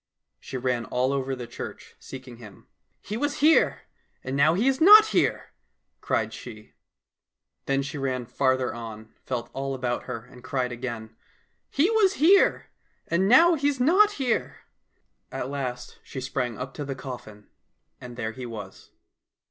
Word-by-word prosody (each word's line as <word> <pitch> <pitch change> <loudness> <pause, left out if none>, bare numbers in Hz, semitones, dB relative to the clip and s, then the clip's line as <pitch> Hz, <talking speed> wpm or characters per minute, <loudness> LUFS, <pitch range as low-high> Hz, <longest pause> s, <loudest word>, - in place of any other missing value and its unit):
She 130 - -7
ran 125 -2 -1
all 130 +2 0
over 135 -1 -2
the 125 -1 -7
church 120 - -9
seeking 130 -2 -10
him. 110 -5 -14 0.2
" - - -48
He 210 - -4
was 290 +3 -1
here 310 +2 +4 0.2
— - - -43
and 130 +1 -4
now 155 +4 +4
he 220 +8 +1
is 270 +1 +1
not 425 +5 +10
here! - - 0 0.2
" - - -52
cried - - -1
she. 110 -3 -11 0.9
Then 135 0 +1
she 145 +1 -6
ran 130 -2 -2
farther 130 +1 0
on, 110 -2 -9
felt 120 -2 -4
all 135 0 -3
about 125 -2 -3
her, 120 -2 -6
and 125 -1 -16
cried 130 -2 -2
again, 120 -2 -6 0.3
'' - - -46
He 325 +10 +2
was 420 -4 +4
here 375 +4 +4 0.2
— - - -43
and 185 +3 +2
now 335 - +7
he's 285 -3 0
not 385 +11 +5
here! 255 - -2 0.3
" - - -44 0.3
At 135 - -4
last 125 -3 -5
she 135 - -8
sprang 130 -2 -3
up 130 +1 -6
to 150 - -5
the 135 -1 -5
coffin, 120 -5 -9 0.5
and 120 -1 -10
there 110 -2 -3
he 125 +2 -8
was. 105 -5 -9
130 Hz, 175 wpm, -26 LUFS, -, 0.9 s, not